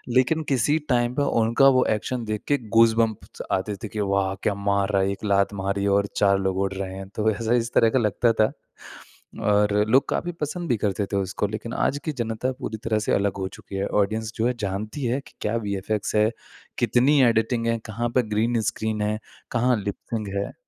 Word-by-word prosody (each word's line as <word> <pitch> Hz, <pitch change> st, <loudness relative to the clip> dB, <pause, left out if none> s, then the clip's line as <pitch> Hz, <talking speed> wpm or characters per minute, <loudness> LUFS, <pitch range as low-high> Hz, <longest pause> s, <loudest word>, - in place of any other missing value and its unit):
लेकिन 145 Hz, +5 st, +3 dB
किसी 135 Hz, +3 st, +2 dB
टाइम 120 Hz, -1 st, +1 dB
पे 145 Hz, -, +1 dB, 0.2 s
उनका 115 Hz, +5 st, +4 dB
वो 130 Hz, -, +3 dB
एक्शन 120 Hz, +3 st, -4 dB
देखकर 110 Hz, +4 st, -2 dB
गूसबम्प्स 115 Hz, -1 st, +2 dB
आते 100 Hz, +2 st, -1 dB
थे 110 Hz, -, -2 dB
कि 105 Hz, -, -6 dB
वाह 100 Hz, -1 st, +1 dB
क्या 105 Hz, -, +2 dB
मार 100 Hz, 0 st, 0 dB
रहा 100 Hz, -2 st, +2 dB
है! 95 Hz, +1 st, +1 dB
1 100 Hz, -, -7 dB
लात 100 Hz, 0 st, +2 dB
मारी 100 Hz, 0 st, -2 dB
और 100 Hz, 0 st, +1 dB
4 100 Hz, -1 st, +4 dB
लोग 95 Hz, -1 st, -1 dB
उड़ 95 Hz, 0 st, 0 dB
रहे 95 Hz, -1 st, -5 dB
हैं 95 Hz, 0 st, -7 dB
तो 110 Hz, 0 st, +2 dB
ऐसा 110 Hz, +2 st, -1 dB
इस 120 Hz, -1 st, 0 dB
तरह 115 Hz, -, +5 dB
का 130 Hz, -, +2 dB
लगता 115 Hz, +2 st, +2 dB
था। 110 Hz, -1 st, +2 dB, 0.9 s
और 105 Hz, 0 st, +3 dB, 0.2 s
लोग 130 Hz, +4 st, +4 dB
काफ़ी 175 Hz, -, -1 dB
पसंद 160 Hz, +4 st, -3 dB
भी 120 Hz, -, +3 dB
करते 100 Hz, 0 st, -1 dB
थे -, -, -1 dB
उसको, 100 Hz, +1 st, -1 dB
लेकिन 110 Hz, +2 st, -6 dB
आज 140 Hz, -, 0 dB
की 155 Hz, -, 0 dB
जनता 120 Hz, 0 st, -2 dB
पूरी 110 Hz, -, -4 dB
तरह 110 Hz, -1 st, +1 dB
से -, -, 0 dB
अलग 100 Hz, -1 st, +1 dB
हो 95 Hz, -, -2 dB
चुकी -, -, -10 dB
है। 100 Hz, +1 st, -1 dB
ऑडियंस 110 Hz, +2 st, -2 dB
जो 115 Hz, -, +1 dB
है 125 Hz, -, +1 dB
जानती 105 Hz, +7 st, -3 dB
है 120 Hz, +3 st, 0 dB
कि -, -, -18 dB
क्या 105 Hz, +2 st, -1 dB
वीएफएक्स 100 Hz, +2 st, -2 dB
है, 105 Hz, +1 st, +4 dB, 0.5 s
कितनी 135 Hz, +4 st, +4 dB
एडिटिंग 115 Hz, +1 st, 0 dB
है, 115 Hz, 0 st, +1 dB
कहाँ 115 Hz, +2 st, -2 dB
पर 125 Hz, -2 st, +3 dB
ग्रीन 110 Hz, +2 st, +1 dB
स्क्रीन 110 Hz, -1 st, -3 dB
है, 105 Hz, +1 st, -1 dB, 0.3 s
कहाँ 125 Hz, +1 st, +2 dB
लिप्सिंग 105 Hz, +1 st, -4 dB
है। 100 Hz, -, -3 dB
110 Hz, 210 wpm, -24 LUFS, 100-120 Hz, 0.9 s, तरह